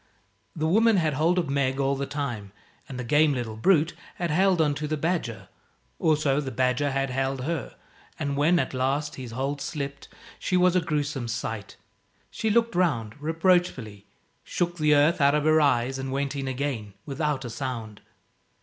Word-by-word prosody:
The 155 Hz, -1 st, -1 dB
woman 220 Hz, +6 st, +4 dB
had 160 Hz, -4 st, +1 dB
hold 165 Hz, +6 st, +2 dB
of 175 Hz, -4 st, +1 dB
Meg 135 Hz, -1 st, 0 dB
all 140 Hz, 0 st, +1 dB
the 140 Hz, 0 st, -3 dB
time, 120 Hz, -9 st, -4 dB, 0.4 s
and 130 Hz, -, -6 dB
the -, -, -3 dB
game 150 Hz, +4 st, +3 dB
little 115 Hz, -3 st, -4 dB
brute 160 Hz, -, +3 dB, 0.2 s
had 175 Hz, -2 st, -2 dB
held 185 Hz, +2 st, +3 dB
on 150 Hz, -2 st, +3 dB
to 150 Hz, +1 st, -4 dB
the 155 Hz, +1 st, -1 dB
badger. 160 Hz, -7 st, -2 dB, 0.5 s
Also 150 Hz, -3 st, +2 dB
the 135 Hz, -, -4 dB
badger 130 Hz, +3 st, +1 dB
had 135 Hz, -1 st, -1 dB
held 135 Hz, 0 st, -1 dB
her, 165 Hz, 0 st, -3 dB, 0.4 s
and 140 Hz, -2 st, -2 dB
when 155 Hz, +5 st, +3 dB
at -, -, -1 dB
last 135 Hz, +3 st, -1 dB
his 130 Hz, -2 st, -7 dB
hold 135 Hz, +4 st, -3 dB
slipped, 140 Hz, -1 st, -5 dB, 0.3 s
she 185 Hz, -, 0 dB
was 180 Hz, 0 st, +4 dB
a 180 Hz, -, +4 dB
gruesome 145 Hz, -5 st, -2 dB
sight. 115 Hz, -3 st, -5 dB, 0.5 s
She 220 Hz, -, -1 dB
looked 230 Hz, +2 st, +2 dB
round, 130 Hz, -12 st, 0 dB
reproachfully, 160 Hz, -, 0 dB, 0.4 s
shook 175 Hz, 0 st, -2 dB
the 150 Hz, -1 st, +4 dB
earth 155 Hz, +4 st, +3 dB
out 140 Hz, +1 st, +5 dB
of 150 Hz, -, +1 dB
her 155 Hz, +1 st, +4 dB
eyes 135 Hz, -2 st, +2 dB
and 135 Hz, 0 st, -4 dB
went 140 Hz, +1 st, -2 dB
in 135 Hz, -1 st, -3 dB
again 125 Hz, -6 st, -3 dB
without 145 Hz, -2 st, -2 dB
a 120 Hz, -, -5 dB
sound. 115 Hz, -4 st, -5 dB
145 Hz, 180 wpm, -26 LUFS, 130-160 Hz, 0.5 s, out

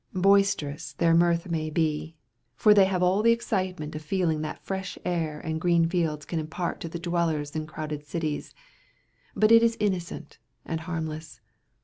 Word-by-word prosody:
Boisterous 180 Hz, -7 st, +2 dB
their 165 Hz, +3 st, +2 dB
mirth 170 Hz, +1 st, +3 dB
may 160 Hz, -2 st, -2 dB
be, 155 Hz, 0 st, -1 dB, 0.4 s
for 210 Hz, -, +6 dB
they 200 Hz, -2 st, +6 dB
have 185 Hz, -2 st, 0 dB
all 185 Hz, +3 st, +3 dB
the 230 Hz, +1 st, +5 dB
excitement 185 Hz, -9 st, -2 dB
of 155 Hz, -, -5 dB
feeling 160 Hz, -1 st, 0 dB
that 155 Hz, -, -6 dB
fresh 190 Hz, -1 st, -4 dB
air 160 Hz, -4 st, -1 dB
and 160 Hz, 0 st, -4 dB
green 170 Hz, -1 st, +3 dB
fields 165 Hz, -4 st, -1 dB
can 165 Hz, -, -2 dB
impart 160 Hz, +3 st, -3 dB
to 165 Hz, -, -5 dB
the 170 Hz, -, -5 dB
dwellers 165 Hz, -4 st, -1 dB
in 155 Hz, -1 st, -3 dB
crowded 150 Hz, -1 st, -5 dB
cities, 150 Hz, 0 st, -4 dB, 0.8 s
but 215 Hz, +1 st, +4 dB
it 230 Hz, 0 st, +8 dB
is 230 Hz, 0 st, +2 dB
innocent 180 Hz, -6 st, -3 dB, 0.3 s
and 165 Hz, -, -3 dB
harmless. 160 Hz, -4 st, -5 dB
165 Hz, 165 wpm, -27 LUFS, 155-185 Hz, 0.8 s, it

